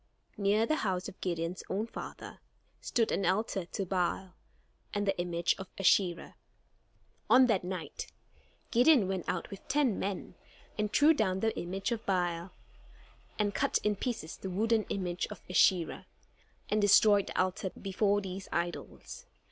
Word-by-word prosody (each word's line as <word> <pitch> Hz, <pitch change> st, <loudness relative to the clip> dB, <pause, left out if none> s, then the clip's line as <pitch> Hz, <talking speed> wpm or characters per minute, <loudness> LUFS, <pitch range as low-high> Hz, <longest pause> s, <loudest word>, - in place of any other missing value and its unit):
Near 210 Hz, +2 st, +2 dB
the 310 Hz, +5 st, +1 dB
house 185 Hz, -7 st, -1 dB
of -, -, -11 dB
Gideon's 170 Hz, 0 st, -2 dB
own 205 Hz, +3 st, -1 dB
father 230 Hz, -, -9 dB, 0.4 s
stood 230 Hz, -2 st, 0 dB
an 200 Hz, -, 0 dB
altar 190 Hz, 0 st, 0 dB
to 195 Hz, -, -3 dB
Baal, 185 Hz, 0 st, -1 dB, 0.6 s
and 205 Hz, 0 st, 0 dB
the 195 Hz, -1 st, +1 dB
image 175 Hz, -1 st, +1 dB
of 190 Hz, -, -6 dB
Asherah. 180 Hz, -2 st, +2 dB, 0.9 s
On 255 Hz, 0 st, +7 dB
that 220 Hz, -7 st, +1 dB
night, 180 Hz, -2 st, -5 dB, 0.6 s
Gideon 245 Hz, -3 st, +5 dB
went 190 Hz, -2 st, -3 dB
out -, -, -3 dB
with 195 Hz, -, -10 dB
ten 270 Hz, -6 st, +1 dB
men, 195 Hz, -1 st, -4 dB, 0.4 s
and 210 Hz, -1 st, -1 dB
threw 295 Hz, +8 st, +6 dB
down 190 Hz, -8 st, 0 dB
the 225 Hz, 0 st, +1 dB
image 195 Hz, +6 st, -3 dB
of 230 Hz, -1 st, -2 dB
Baal, 175 Hz, -2 st, 0 dB, 0.9 s
and 205 Hz, -1 st, 0 dB
cut -, -, +1 dB
in 210 Hz, 0 st, +1 dB
pieces 225 Hz, -6 st, -4 dB
the 190 Hz, -, -6 dB
wooden 220 Hz, +3 st, +1 dB
image 180 Hz, -2 st, -2 dB
of 210 Hz, -, -10 dB
Asherah, 180 Hz, -1 st, +2 dB, 0.6 s
and 210 Hz, 0 st, +1 dB
destroyed 205 Hz, 0 st, +5 dB
the -, -, -3 dB
altar 185 Hz, +1 st, 0 dB
before 200 Hz, +1 st, +1 dB
these 190 Hz, 0 st, -7 dB
idols. 175 Hz, -, -5 dB
195 Hz, 150 wpm, -31 LUFS, 180-215 Hz, 0.9 s, On